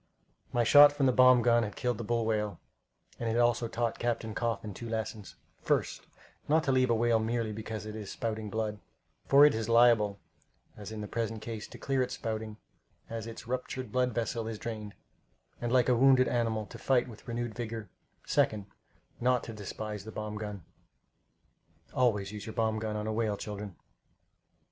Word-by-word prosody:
My 120 - +2
shot 145 +5 +9
from 145 -1 0
the 130 - +5
bomb 125 -1 +6
gun 120 0 +4
had 105 -3 -4
killed 125 -4 -1
the - - -3
bull 115 +1 0
whale, 105 -4 -1 0.6
and 115 - -1
it - - 0
had 120 - +1
also 120 0 +2
taught 115 0 -2
Captain 115 -2 -2
Coffin 110 -2 -2
two 115 +5 -7
lessons: 110 -2 -4 0.3
First, - - -1 0.4
not 155 +2 +3
to 135 - +1
leave 130 -1 +3
a 115 - +4
whale 115 0 +3
merely 110 0 -1
because 110 0 -6
it 110 0 -6
is 105 -3 -6
spouting 110 -2 -3
blood, 105 0 -2 0.5
for 140 +1 +8
it 150 - +5
is 110 0 -3
liable, 115 -4 +4 0.6
as 105 0 -9
in 110 -1 -5
the 105 - -5
present 115 0 -3
case, 115 -2 -6
to - - -11
clear 135 -1 0
its 125 - -1
spouting, 110 -2 -4 0.5
as 115 -1 -4
its 115 - -8
ruptured 130 +1 -4
blood 125 0 +1
vessel 115 0 -2
is 115 -1 -4
drained, 105 -2 -6 0.7
and 120 -1 -2
like 125 -2 +4
a 125 - +4
wounded 130 +1 +5
animal, 115 -3 0
to - - -11
fight 130 -2 +2
with 115 0 -13
renewed 120 -1 -3
vigor; 115 -3 -5 0.4
second, 105 -2 +1 0.5
not 125 0 +2
to 115 - -7
despise 105 0 -6
the 110 - -8
bomb 105 0 -5
gun. 105 -3 -6 1.3
Always 105 -6 +1
use 105 +1 -7
your 110 - -6
bomb 110 -2 +1
gun 110 -1 -3
on 105 0 -3
a 110 - -2
whale, 110 -2 0
children. 105 -3 -6
115 Hz, 190 wpm, -30 LUFS, 110-120 Hz, 1.3 s, shot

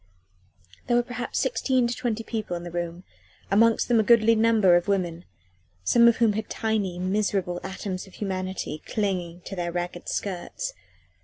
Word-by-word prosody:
There 240 - +3
were 240 - +3
perhaps 245 0 -5
sixteen 260 - +1
to 235 - 0
twenty 235 -3 -2
people 215 -6 -3
in 170 - -8
the 175 - -7
room 175 +1 -4 0.5
amongst 225 +3 +4
them 235 -2 +4
a - - +4
goodly 230 0 +5
number 220 -5 +4
of 175 +2 +1
women, 180 -4 -1 0.6
some 235 - +5
of 235 - +5
whom 230 -3 +3
had 220 +1 -4
tiny, 210 -5 -1
miserable 185 -1 0
atoms 190 0 -5
of 190 - -16
humanity 185 -5 -4
clinging 180 -5 -2
to 195 - -7
their 175 -1 -2
ragged 175 0 -4
skirts. 205 - -3
200 Hz, 165 wpm, -26 LUFS, 180-230 Hz, 0.6 s, goodly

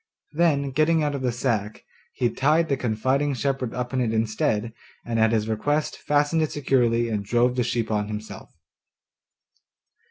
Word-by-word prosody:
Then 150 -4 +1
getting 155 +3 +2
out 145 -1 0
of 140 - -4
the 125 -1 0
sack, 115 -4 -2 0.3
he 120 -2 0
tied 155 +6 +2
the 140 - +2
confiding 130 +4 0
shepherd 135 -1 -2
up 125 +1 -4
in 130 - +1
it 115 -3 0
instead, 110 0 0 0.3
and 115 -1 -1
at 110 0 +4
his 110 -1 0
request 145 +8 -1
fastened 145 +2 +1
it 155 - 0
securely 120 -4 +1
and 105 -3 -2
drove 120 +4 +1
the 125 - +1
sheep 115 -2 -1
on 105 -1 0
himself. 105 0 -7
125 Hz, 165 wpm, -24 LUFS, 110-145 Hz, 0.3 s, at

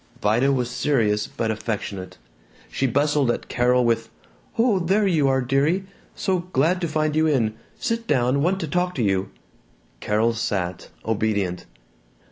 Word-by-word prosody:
Vida 120 +5 +2
was 125 -2 0
serious 115 -5 +1
but 115 -1 -2
affectionate. 105 -4 -4 0.5
She 135 - 0
bustled 145 +1 +2
at - - -2
Carol 125 0 +2
with, 115 -1 +1 0.5
"Oh, 225 -4 +3
there 195 +5 +2
you 160 -7 +3
are, 135 0 +2
dearie, 140 +9 +1 0.3
so 190 -2 0
glad 165 +8 +2
t' 170 - 0
find 155 -1 0
you 160 0 +3
in, 120 -8 +1 0.2
sit 230 -1 -2
down, 130 0 +2
want 185 +5 +1
to 160 - -2
talk 180 +4 -1
to 125 - 0
you." 95 -1 0 0.7
Carol 110 +2 +1
sat, 95 -5 -3 0.2
obedient. 100 -5 -1
130 Hz, 150 wpm, -23 LUFS, 110-155 Hz, 0.7 s, Oh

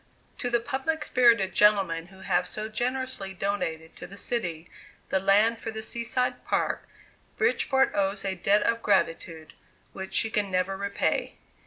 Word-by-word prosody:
To 245 - -2
the 235 0 +2
public 285 +5 -2
spirited 235 -7 +4
gentlemen 195 -6 +3
who 190 0 -16
have 180 -1 +1
so 215 0 -5
generously 240 -3 -3
donated 165 -4 -3
to - - -8
the 200 - -12
city 175 -9 -3 0.4
the 190 - +2
land 210 +4 +3
for 225 - -5
the 220 0 -5
Sea 235 +1 -3
side 250 +1 -1
Park, - - -1 0.5
Bridgeport 270 - +2
owes 195 0 0
a 190 - 0
debt 200 +3 +2
of 230 0 +1
gratitude 165 -5 0 0.4
which 190 0 -6
she 225 - +3
can 205 -2 0
never 185 +1 0
repay. 200 +1 -1
200 Hz, 160 wpm, -27 LUFS, 190-235 Hz, 0.5 s, spirited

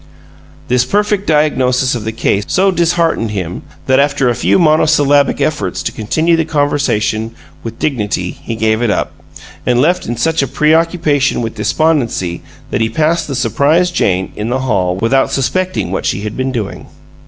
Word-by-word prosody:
This 125 0 +2
perfect 205 +4 0
diagnosis 130 -4 +2
of 115 -4 -4
the 110 - -2
case 105 -2 0
so 195 +1 +2
disheartened 170 -8 +1
him 90 -4 -4 0.2
that 130 0 +3
after 140 -2 +2
a - - +2
few - - +2
monosyllabic 155 -4 +3
efforts 150 +1 -1
to - - -2
continue 155 +10 0
the 165 - +1
conversation 140 -7 -1 0.3
with 115 0 -7
dignity 105 -10 -2
he 115 - -7
gave 110 0 0
it 120 - +1
up, - - -1 0.5
and 125 -1 +1
left 170 +7 +1
in 120 +1 -3
such 160 +6 +1
a 140 - -1
preoccupation 150 -1 +1
with 115 - -4
despondency 125 - 0 0.3
that - - -1
he 110 - +1
passed 160 +7 0
the 140 - -4
surprised 145 - +1
Jane 95 - 0
in 105 +2 -4
the 130 +2 -1
hall 95 -8 0
without 115 +7 +1
suspecting 180 - -1
what 95 - -2
she 100 - -1
had 105 0 -5
been 130 0 -2
doing. 110 -6 -5
135 Hz, 170 wpm, -14 LUFS, 110-155 Hz, 0.5 s, that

